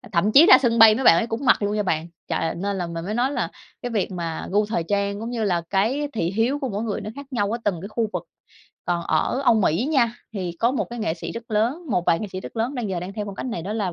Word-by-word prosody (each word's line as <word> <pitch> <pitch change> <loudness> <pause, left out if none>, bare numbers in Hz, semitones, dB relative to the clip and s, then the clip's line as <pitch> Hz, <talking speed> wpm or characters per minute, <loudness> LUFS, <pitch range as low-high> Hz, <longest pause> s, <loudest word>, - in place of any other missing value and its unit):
à, - - -14
thậm 195 +4 +2
chí 300 +7 +8
ra 405 - +9
sân 235 -3 +1
bay 220 -1 +9
mấy 265 - -2
bạn 165 - +8
ấy 225 - +1
cũng 230 +4 -4
mặc 245 - +4
luôn 205 +1 0
nha 210 - +1
bạn, 165 -3 -1 0.2
trời - - 0
ơi, 165 - -1
nên 200 +2 -3
là 175 - -2
mình 165 0 -5
mới 210 +4 -3
nói 250 +4 +1
là - - -1 0.3
cái 245 - -3
việc 210 -4 -1
mà 170 -2 -4
gu 205 +2 +2
thời 205 -5 -1
trang 200 +3 -1
cũng 230 +2 -4
như 230 -3 -2
là 175 -4 +1
cái 245 +10 +1
thị 175 -6 -1
hiếu 230 +8 0
của 270 - -2
mỗi 205 -1 -3
người 220 -3 -3
nó 215 - -6
khác 280 -1 -8
nhau 205 -5 0
ở 235 - -3
từng 185 -5 0
cái 195 - -6
khu 220 0 -1
vực. - - -3 0.6
Còn 175 -1 -1
ở 160 - 0
Âu 240 - +5
Mỹ 205 - +1
nha, 240 -6 +2 0.2
thì 185 -5 -3
có 235 - +3
một 270 - 0
cái 240 - -6
nghệ 215 -8 -1
sĩ - - -6
rất 230 0 -8
lớn, 240 +11 0
một 180 - +1
vài 165 - +4
nghệ 215 - -3
sĩ 185 - -4
rất - - -10
lớn 235 +5 -1
đang 240 -5 -3
giờ 180 -2 -2
đang 180 +2 -6
theo 210 +1 -4
phong 200 - -6
cách - - -5
này 220 -9 -4
đó 195 +5 -4
là 205 -5 -2
210 Hz, 315 wpm, -23 LUFS, 185-235 Hz, 0.6 s, ra